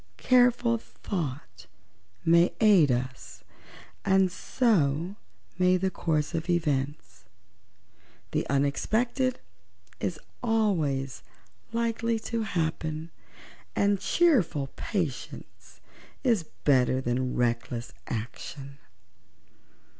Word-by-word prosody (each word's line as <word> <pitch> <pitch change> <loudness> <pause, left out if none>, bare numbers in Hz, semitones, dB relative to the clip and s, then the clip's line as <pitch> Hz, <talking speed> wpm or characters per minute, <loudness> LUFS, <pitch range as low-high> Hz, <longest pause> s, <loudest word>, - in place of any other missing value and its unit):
Careful 245 -2 +4
thought 130 - -6 0.6
may 170 +2 +5
aid 195 - +6
us, 125 +1 -4 0.6
and 190 -1 +3
so 180 - +1 0.4
may 180 0 +4
the 190 +1 0
course 155 -4 -1
of 165 +2 -3
events. 140 - -1 1.1
The - - -1
unexpected 220 - +1 0.6
is - - -2 0.2
always 160 - 0 0.5
likely 230 0 0
to 230 -1 0
happen, 160 -4 -2 0.6
and 200 -1 +2
cheerful 195 - +2
patience 165 - -5 0.4
is 225 - +1
better 130 -2 +3
than 125 0 -1
reckless 120 0 -1 0.2
action." 135 +4 -6
165 Hz, 80 wpm, -28 LUFS, 135-215 Hz, 1.1 s, aid